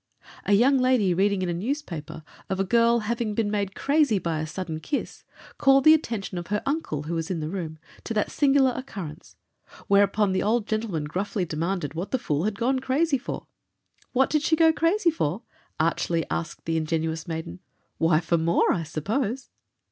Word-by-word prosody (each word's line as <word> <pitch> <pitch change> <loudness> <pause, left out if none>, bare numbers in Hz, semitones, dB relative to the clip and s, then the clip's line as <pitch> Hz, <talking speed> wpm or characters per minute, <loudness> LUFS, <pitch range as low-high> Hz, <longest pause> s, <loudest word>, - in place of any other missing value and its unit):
A 205 - +2
young 260 +6 +5
lady 250 -8 +3
reading 195 +1 +1
in 180 - -1
a - - 0
newspaper 180 - -4 0.3
of 190 - -2
a - - +3
girl 235 +3 +3
having 220 -1 -2
been 210 -2 0
made 200 -2 -2
crazy 285 -6 +2
by 165 -3 -2
a 155 - -3
sudden 160 0 -5
kiss, 285 - -4 0.4
called 270 -1 +5
the 310 - +9
attention 225 - -2
of 175 - -8
her 210 0 -1
uncle, 275 - -2
who 160 +3 -4
was 165 -1 -2
in 180 -3 -2
the 155 +1 -4
room, 165 -5 -5 0.3
to 230 - -3
that 210 - 0
singular 275 -2 +3
occurrence, 195 - -8 0.5
whereupon 200 0 +3
the 185 - +1
old 220 +1 +1
gentleman 215 -8 -2
gruffly 185 +5 -2
demanded 165 0 -2
what 170 +4 -4
the 260 - +1
fool 155 - -1
had 210 -2 -1
gone 260 +3 +1
crazy 275 +2 +1
for. 265 - -6 0.7
"What 265 +1 +2
did 305 0 +2
she 320 - +2
go 320 0 +5
crazy 340 +3 +2
for?" 205 - -2 0.4
archly 165 0 0
asked 155 -3 -4
the 165 0 0
ingenuous 160 0 -2
maiden; 160 - -5 0.4
"why, 165 -1 +3
for 170 0 +1
more, 165 +1 +3
I 170 - -1
suppose." 215 - -3
200 Hz, 185 wpm, -25 LUFS, 165-255 Hz, 0.7 s, the